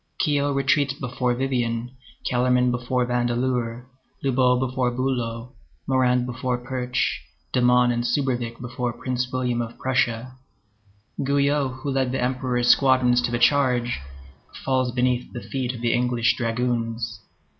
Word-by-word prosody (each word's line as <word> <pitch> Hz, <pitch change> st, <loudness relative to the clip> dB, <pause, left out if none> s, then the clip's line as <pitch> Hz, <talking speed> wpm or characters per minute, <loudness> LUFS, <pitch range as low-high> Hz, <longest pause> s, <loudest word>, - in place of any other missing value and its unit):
Quiot 145 Hz, -1 st, +1 dB
retreats 140 Hz, 0 st, +2 dB
before 125 Hz, -1 st, -1 dB
Vivian, 120 Hz, -2 st, -1 dB, 0.3 s
Kellermann 125 Hz, 0 st, +2 dB
before 125 Hz, +1 st, 0 dB
Vandeleur, 120 Hz, 0 st, -1 dB, 0.4 s
Lobau 125 Hz, -2 st, +3 dB
before 130 Hz, -1 st, 0 dB
Bülow, 120 Hz, -2 st, -2 dB, 0.3 s
Morand 125 Hz, -2 st, +2 dB
before 125 Hz, 0 st, -2 dB
Pirch, 125 Hz, 0 st, -2 dB, 0.3 s
Domon 125 Hz, 0 st, +4 dB
and 120 Hz, 0 st, -1 dB
Subervic 120 Hz, -3 st, -1 dB
before 125 Hz, 0 st, -3 dB
Prince 125 Hz, +1 st, -3 dB
William 125 Hz, -2 st, 0 dB
of 115 Hz, 0 st, -6 dB
Prussia; 125 Hz, -1 st, 0 dB, 0.9 s
Guyot, 140 Hz, -1 st, +1 dB
who 140 Hz, -, -1 dB
led 130 Hz, -2 st, 0 dB
the 130 Hz, -, -1 dB
Emperor's 125 Hz, -1 st, 0 dB
squadrons 130 Hz, -2 st, +4 dB
to 120 Hz, -, -1 dB
the 120 Hz, -, 0 dB
charge, 125 Hz, -, +2 dB, 0.7 s
falls 130 Hz, -2 st, +1 dB
beneath 125 Hz, 0 st, 0 dB
the 120 Hz, -, -4 dB
feet 130 Hz, -2 st, -3 dB
of 120 Hz, -2 st, -8 dB
the 120 Hz, -1 st, +1 dB
English 120 Hz, -1 st, +2 dB
dragoons. 115 Hz, -1 st, -2 dB
125 Hz, 130 wpm, -24 LUFS, 120-130 Hz, 0.9 s, Domon